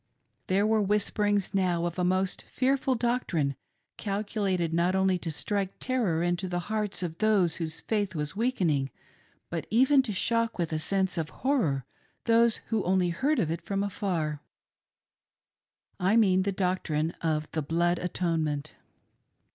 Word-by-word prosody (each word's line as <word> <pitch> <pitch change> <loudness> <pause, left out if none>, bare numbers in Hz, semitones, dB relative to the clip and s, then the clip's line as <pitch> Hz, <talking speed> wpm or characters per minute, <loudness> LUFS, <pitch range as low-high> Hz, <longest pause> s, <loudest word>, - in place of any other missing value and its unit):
There 195 +2 +2
were 220 0 +3
whisperings 205 0 +1
now 180 -3 +1
of 175 +1 -3
a - - +1
most 185 +1 +1
fearful 265 0 0
doctrine, 225 - 0 0.4
calculated 200 -4 -1
not 175 +3 +2
only 190 -1 +2
to 165 - -4
strike 195 +5 -2
terror 220 -11 0
into 175 +2 -1
the 175 - -1 0.2
hearts 210 -3 -2
of 165 -1 -5
those 200 -7 +3
whose 160 -2 -4
faith 205 -4 -1
was 150 +1 -2
weakening, 180 - +1 0.6
but 165 -2 -3
even 265 +5 +5
to 250 -5 -3
shock 230 +3 0
with 170 -3 -1
a 155 - 0
sense 190 +1 0
of 160 -1 -2
horror 170 - 0 0.4
those 230 0 +3
who 220 -3 +1
only 180 -1 +2
heard 275 - +1
of 160 - +1
it 165 - -3
from 200 0 -2
afar 170 -7 -2 0.8
— - - -52
I 215 - +4
mean 190 -4 +4
the 200 +1 0
doctrine 180 -4 0
of 155 -2 0
the 155 - -1
Blood 170 +4 +1
Atonement. 160 -5 -1
185 Hz, 155 wpm, -28 LUFS, 165-210 Hz, 0.8 s, even